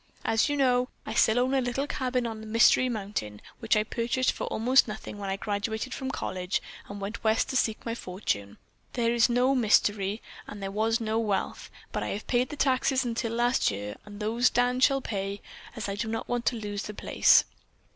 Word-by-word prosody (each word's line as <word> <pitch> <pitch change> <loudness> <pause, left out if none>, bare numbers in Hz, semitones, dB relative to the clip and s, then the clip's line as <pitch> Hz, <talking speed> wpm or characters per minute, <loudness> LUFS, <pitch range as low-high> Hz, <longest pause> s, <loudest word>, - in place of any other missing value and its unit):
As 225 +5 +2
you 290 - 0
know, 250 -2 +2 0.2
I - - -4
still 220 +2 +4
own 255 +2 +2
a 270 - +3
little 245 +3 -1
cabin 255 -3 -1
on 220 -1 -6
Mystery 240 +2 +5
Mountain 195 - -4 0.2
which 225 -2 +2
I 215 - +3
purchased 235 +3 0
for - - -5
almost 250 +4 +3
nothing 210 -1 -7
when 200 -1 -4
I 195 - 0
graduated 220 +4 -3
from 265 -1 -4
college 185 -7 -2 0.3
and 205 0 -7
went 205 +4 -6
West 220 0 +2
to - - -3
seek 220 -4 0
my 230 - -2
fortune. 180 - -4 0.4
There 235 -1 +1
is 235 +1 +4
no 250 +3 +3
mystery, 210 -3 +2 0.2
and 205 - -8
there 195 -1 -4
was 220 +2 +1
no 220 0 -1
wealth, 205 -4 -2 0.2
but - - -2
I - - -2
have 210 - -4
paid 245 0 +1
the - - -6
taxes 265 -1 +2
until 230 -1 -2
last 240 +2 +2
year 105 +1 -5
and 205 0 -11
those 230 +3 +2
Dan 245 +1 +1
shall 270 +1 +4
pay, 200 -3 -3 0.4
as 220 -4 -4
I 200 - -2
do 210 +3 -3
not 225 0 -3
want 245 -1 -2
to 245 - +2
lose 205 -2 -4
the 210 - -7
place. - - +5
225 Hz, 205 wpm, -28 LUFS, 205-245 Hz, 0.4 s, Mystery